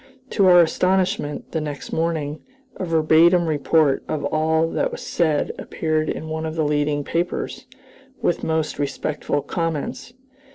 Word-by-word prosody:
To 195 -3 +3
our 175 -1 +8
astonishment, 185 -2 0
the 160 - -1
next 145 -2 -6
morning, 160 -2 -1 0.4
a 185 - -3
verbatim 165 +2 +4
report 155 -1 +2
of 150 -2 -2
all 160 +1 +1
that - - 0
was 480 - -7
said 155 -4 +1
appeared 155 -1 -1
in 160 - -4
one 160 0 -3
of 160 - -5
the 160 -2 0
leading 145 0 0
papers, 170 +4 -3 0.5
with 175 - 0
most 160 -2 -1
respectful 145 0 -2
comments. 165 +6 -3
160 Hz, 140 wpm, -22 LUFS, 150-170 Hz, 0.5 s, our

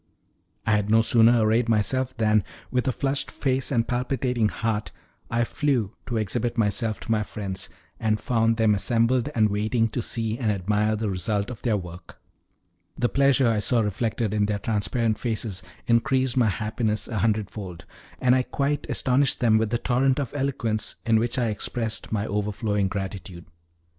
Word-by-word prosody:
I 110 - +1
had 105 -1 +1
no 110 +1 +5
sooner 115 +1 +5
arrayed 115 +2 +2
myself 125 +4 +1
than, 110 -2 +3 0.3
with 125 +1 0
a - - +3
flushed 135 +2 -1
face 135 -1 -1
and 115 -3 +1
palpitating 125 -2 0
heart, 110 -1 -2 0.4
I 120 0 +1
flew 120 -5 0
to 120 - -2
exhibit 115 +3 -1
myself 110 0 0
to 115 - -4
my 110 -1 +2
friends, 100 -2 -5 0.3
and 110 -1 +1
found 115 -3 +1
them 110 -2 +4
assembled 115 +6 +1
and 110 -2 +4
waiting 110 +3 +1
to 120 - -2
see 115 0 -1
and 110 -4 +1
admire 105 +2 +1
the 110 -1 -2
result 100 +4 -1
of 120 - -9
their 115 -4 +1
work. 90 -2 -10 0.8
The 120 - +1
pleasure 140 -2 +3
I 110 -2 +2
saw 115 +3 +3
reflected 110 +1 -1
in 105 -1 +1
their 105 -1 0
transparent 110 +2 -1
faces 110 -5 -2 0.2
increased 130 +2 +2
my 120 -4 +3
happiness 110 +1 -2
a 110 -4 -3
hundredfold, 105 -4 -2 0.3
and 125 -1 +4
I 130 - +3
quite 140 +3 -2
astonished 135 +2 +2
them 110 -3 +4
with 110 -1 0
the 120 - +1
torrent 130 +2 +1
of 135 -3 -3
eloquence 130 -6 -2
in 115 -1 +4
which 120 +3 -1
I 120 -3 +1
expressed 110 +1 -3
my 110 -1 0
overflowing 105 -1 -1
gratitude. 95 -3 -6
115 Hz, 170 wpm, -25 LUFS, 105-125 Hz, 0.8 s, no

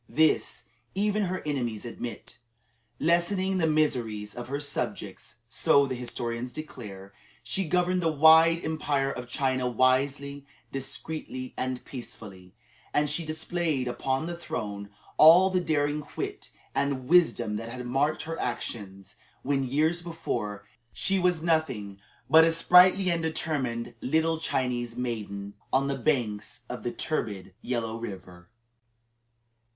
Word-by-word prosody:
This, 155 +1 +2 0.3
even 210 +1 +1
her 185 +1 -3
enemies 120 -8 -2
admit. 120 0 -7 0.6
"Lessening 185 +3 +1
the 165 - +2
miseries 120 -9 0
of 120 0 -7
her 140 +2 -3
subjects," 145 - -5
so 140 0 +4
the 135 - -3
historians 120 0 -4
declare, 105 -9 -9 0.3
she 185 +12 -1
governed 180 +1 +2
the 165 -1 +2
wide 160 +2 +6
Empire 145 -3 0
of 125 -2 -7
China 130 -2 0
wisely, 140 +3 +1 0.3
discreetly, 135 -1 -5
and 130 -1 -3
peacefully; 100 -7 -9 0.4
and 150 0 +2
she 165 +3 0
displayed 155 -3 -1
upon 130 +4 -1
the 170 +1 -4
throne 105 -11 -5 0.3
all 175 +5 +8
the 185 - +2
daring, 150 -2 0
wit, - - -4 0.2
and 135 -3 -1
wisdom 160 -10 +3
that 115 +1 -6
had 125 +1 -6
marked 140 +5 0
her 165 +1 -5
actions 100 -4 -5 0.3
when, 135 0 +1
years 155 +6 +1
before, 105 -12 -4 0.3
she 195 0 +1
was 180 -3 +1
nothing 130 - 0 0.3
but 160 +1 +8
a 165 - +4
sprightly 180 +3 +6
and 170 -1 0
determined 150 -7 -2
little 160 +4 +1
Chinese 120 -5 -1
maiden, 105 -5 -4 0.2
on 135 +1 +3
the 140 0 -1
banks 120 -4 -1
of 125 - -5
the 120 - -2
turbid 100 -12 -3
Yellow 115 -3 -2
River. 90 -5 -9
135 Hz, 130 wpm, -28 LUFS, 120-160 Hz, 0.6 s, all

